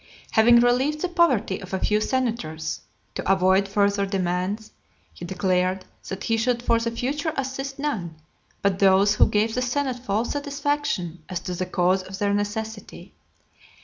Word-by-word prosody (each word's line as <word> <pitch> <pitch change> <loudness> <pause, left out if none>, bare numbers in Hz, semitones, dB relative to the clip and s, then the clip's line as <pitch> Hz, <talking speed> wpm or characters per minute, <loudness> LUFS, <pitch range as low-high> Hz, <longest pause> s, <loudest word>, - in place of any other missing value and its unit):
Having 235 +2 +6
relieved 260 +5 +2
the 365 - +1
poverty 335 - +2
of 190 0 -5
a - - -2
few 210 +2 +1
senators, 215 -13 -2 0.3
to - - -1
avoid 190 +1 +3
further 200 0 +1
demands, 195 +2 -2 0.4
he 175 - -8
declared 185 0 0 0.2
that 190 0 -5
he 225 -1 +1
should 240 +1 0
for 230 -1 +3
the 230 0 -1
future 280 +7 -2
assist 270 +1 -3
none, 215 - -3 0.5
but 195 -1 +1
those 195 +1 +5
who - - +5
gave 215 +2 +1
the 250 - -1
senate 255 0 -1
full 220 -1 -1
satisfaction 285 - -2
as 180 -2 -2
to 180 - -4
the 180 +1 -3
cause 185 +2 +2
of 190 +1 -8
their 200 0 +1
necessity. 210 +1 -4
210 Hz, 160 wpm, -24 LUFS, 190-250 Hz, 0.5 s, Having